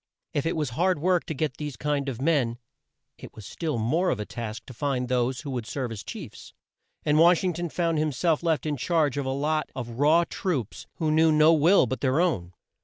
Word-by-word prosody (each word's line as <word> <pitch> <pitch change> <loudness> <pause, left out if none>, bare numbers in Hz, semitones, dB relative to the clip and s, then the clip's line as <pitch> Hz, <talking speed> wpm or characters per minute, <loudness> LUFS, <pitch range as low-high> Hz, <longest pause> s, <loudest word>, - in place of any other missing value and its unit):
If 145 +2 0
it 165 - -1
was 150 -6 -2
hard 180 +8 +1
work 180 +3 +1
to 160 - -3
get 150 -2 -2
this 150 -3 -5
kind 145 -1 -1
of 125 -3 -6
men, 135 -6 +1 0.6
it 125 - -11
was 110 - -10
still 155 - -3
more 155 +12 +1
of 115 - -1
a 105 - -3
task 115 -1 -6
to 130 - -10
find 130 0 -2
those 125 +1 0
who 140 -2 -6
would 120 -4 -4
serve 130 -3 -3
as 110 -3 -6
chiefs, - - -9 0.5
and 150 +1 +3
Wash 170 +2 +5
ing 180 -1 +1
ton 170 +1 -4
found 165 -1 0
him 155 0 0
self 160 +3 +1
left 165 -3 0
in 150 -2 -1
charge 155 0 +1
of 140 -2 -2
a - - 0
lot 150 +2 -1
of 120 -1 -6
raw 155 +4 +5
troops 140 - -3
who 155 -2 -1
knew 160 +1 +4
no 155 +1 +6
will 165 +2 +5
but 125 0 -4
their 135 +3 +2
own. 95 - 0
150 Hz, 230 wpm, -26 LUFS, 125-165 Hz, 0.6 s, no